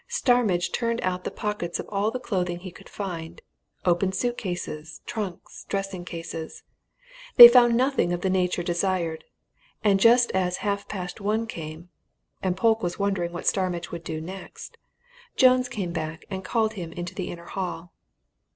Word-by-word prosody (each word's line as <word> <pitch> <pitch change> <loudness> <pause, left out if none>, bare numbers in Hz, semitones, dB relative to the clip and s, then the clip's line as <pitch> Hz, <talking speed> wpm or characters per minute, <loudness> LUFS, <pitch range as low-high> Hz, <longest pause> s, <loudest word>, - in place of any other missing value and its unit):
Starmidge 245 - +2
turned 230 -1 -1
out 185 0 -2
the - - -1
pockets 210 -5 -3
of - - -5
all 205 +1 0
the 255 +3 -4
clothing 180 -7 -2
he 185 -1 -8
could - - -15
find: 170 -5 -6 0.5
opened 185 +2 +2
suit 240 +4 0
cases, 160 -6 -5
trunks, 200 -6 -6
dressing 195 -3 -3
cases. 165 -2 -7 0.7
They 240 - +14
found 240 -1 +5
nothing 260 -8 +2
of 175 0 -2
the 190 - 0
nature 180 -1 +1
desired. 175 -2 -1 0.6
And 200 -2 +4
just 235 +3 +5
as 180 -1 0
half 200 0 -1
past 180 -1 -6
one 215 +3 0
came, 165 -4 -8 0.5
and 185 -1 -1
Polke 225 +2 +3
was 175 0 -2
wondering 195 -4 -1
what 175 - -6
Starmidge 180 -3 0
would 170 -1 -6
do 160 -2 -4
next, 185 +4 -9 0.6
Jones 255 -1 +5
came 195 -8 -4
back 160 -1 -5
and 190 0 -4
called 220 0 0
him 170 -5 -6
into 175 +1 -6
the 185 -1 -4
inner 170 0 -8
hall. 175 -2 -5
185 Hz, 165 wpm, -25 LUFS, 175-215 Hz, 0.7 s, They